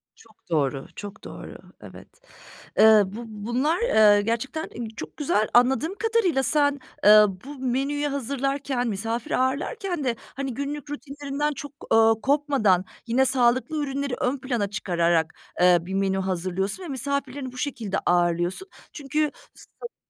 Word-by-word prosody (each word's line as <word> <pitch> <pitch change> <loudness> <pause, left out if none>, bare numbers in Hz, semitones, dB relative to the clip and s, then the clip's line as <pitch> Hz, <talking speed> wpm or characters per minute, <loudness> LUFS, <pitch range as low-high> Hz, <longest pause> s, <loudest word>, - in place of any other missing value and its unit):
Çok 220 -5 -23
doğru, 140 -4 0
çok 205 +1 -9
doğru. - - -9 0.2
Evet. - - -12 0.7
Eee, 220 -1 +7
bu 210 +5 -7
bunlar, 240 +9 -1
eee, 215 - +5
gerçekten 235 +9 -3 0.3
çok - - -8
güzel. 215 -8 +1
Anladığım 265 +9 +3
kadarıyla 415 -10 +1
sen, 285 0 +2 0.3
eee, 210 0 +9 0.2
bu 285 0 -9
menüyü 275 +4 0
hazırlarken, 275 -1 -2
misafir 225 +3 -3
ağırlarken 300 - -1
de, 245 -3 0 0.2
hani, 270 -1 -3
günlük 285 +3 -5
rutinlerinden 290 0 -3
çok, 285 0 -8 0.2
ııı, 225 0 +5
kopmadan, 270 -10 +2 0.2
yine 250 +3 +3
sağlıklı 260 +4 +2
ürünleri 280 -1 -3
ön 255 +3 0
plana 245 -6 -2
çıkararak, 170 -4 0 0.3
eee, 180 -1 +6
bir 180 +3 -7
menü 195 0 0
hazırlıyorsun 190 - -2
ve 350 - -7
misafirlerini 275 0 -3
bu 255 - -13
şekilde 245 -8 -3
ağırlıyorsun. 175 - +1 0.3
Çünkü 300 +1 -1 0.2
sanıyorum 475 - -12
255 Hz, 135 wpm, -25 LUFS, 210-285 Hz, 0.7 s, eee